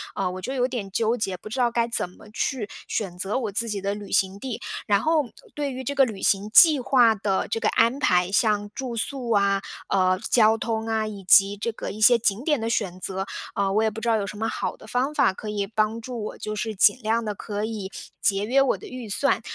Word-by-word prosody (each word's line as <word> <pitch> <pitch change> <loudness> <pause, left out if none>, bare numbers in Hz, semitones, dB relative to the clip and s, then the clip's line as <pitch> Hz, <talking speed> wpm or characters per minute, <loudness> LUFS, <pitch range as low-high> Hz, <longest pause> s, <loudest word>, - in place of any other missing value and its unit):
呃， 190 -2 -1
我 185 0 -7
就 260 - -4
有 250 -2 +1
点 230 -7 -5
纠 225 +4 +1
结， 195 -4 -2
不 200 - -11
知 250 +5 -4
道 245 -1 +3
该 235 0 +1
怎 230 -6 +1
么 185 - -17
去 235 -2 -2 0.2
选 190 -5 -3
择 195 +6 -2
我 230 -5 -2
自 225 +4 0
己 205 -2 -3
的 200 +1 -1
旅 205 -1 -9
行 195 0 +1
地。 255 -1 -5 0.3
然 200 -1 +3
后 315 0 +2 0.3
对 290 -2 -2
于 260 +1 -6
这 280 - -3
个 275 -1 +5
旅 215 -5 -7
行 200 +1 +1
计 305 +5 +7
划 245 -3 +4
的 195 -2 -1
这 225 - -2
个 - - 0
安 235 +4 +2
排， 180 -8 +2
像 205 -2 +1
住 255 -3 -4
宿 245 +1 0
啊， 200 -2 +2 0.3
呃， 185 -1 +2
交 220 -1 +4
通 225 0 -2
啊， 220 -1 0
以 205 -2 -8
及 195 +2 +5
这 230 +3 -2
个 220 - -6
一 215 - -9
些 240 +2 +7
景 215 0 0
点 295 -3 +1
的 225 - -2
选 190 -5 -2
择， 190 +1 -3 0.3
呃， 200 -1 0
我 215 +2 +2
也 220 - +2
不 220 +1 -8
知 235 - -4
道 230 - +3
有 205 - -2
什 210 - -7
么 220 +1 -1
好 - - -3
的 - - -15
方 255 +6 -1
法 190 - +3
可 210 +2 -7
以 205 -1 -2
帮 215 +2 0
助 235 -1 -6
我， - - -7
就 215 0 -5
是 220 0 -3
尽 205 +4 +5
量 225 +1 0
地 210 - -2
可 205 +1 -4
以 210 -4 -5 0.3
节 200 0 +1
约 265 +5 +3
我 270 - +2
的 - - -11
预 250 -4 -8
算。 245 +3 +1
220 Hz, 270 characters per minute, -24 LUFS, 200-240 Hz, 0.3 s, 计